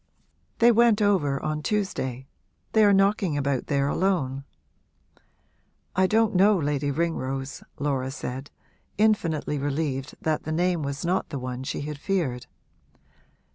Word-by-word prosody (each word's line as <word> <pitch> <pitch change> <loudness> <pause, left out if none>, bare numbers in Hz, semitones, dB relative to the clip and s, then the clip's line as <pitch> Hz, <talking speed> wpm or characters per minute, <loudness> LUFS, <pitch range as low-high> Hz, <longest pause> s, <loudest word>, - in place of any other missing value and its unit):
'They 235 +1 +6
went 235 -1 +4
over 185 -10 +2
on 155 0 -2
Tuesday 140 - -2 0.5
they 220 - +4
are 205 - +6
knocking 195 -5 +2
about 140 -2 -1
there 140 -2 +1
alone.' 140 -6 0 1.5
'I 190 +1 +4
don't 220 +1 +2
know 200 +2 +5
Lady 145 -2 -1
Ringrose,' 135 -3 -2 0.2
Laura 135 -3 -1
said, 135 0 -6 0.5
infinitely 165 -9 +1
relieved 140 -1 -2
that 155 -1 -1
the 155 - -5
name 175 +1 +1
was 140 +2 -4
not 180 +2 0
the 140 - -4
one 125 -1 -5
she 130 - -3
had 150 0 -5
feared. 145 -10 -2
150 Hz, 135 wpm, -26 LUFS, 140-195 Hz, 1.5 s, They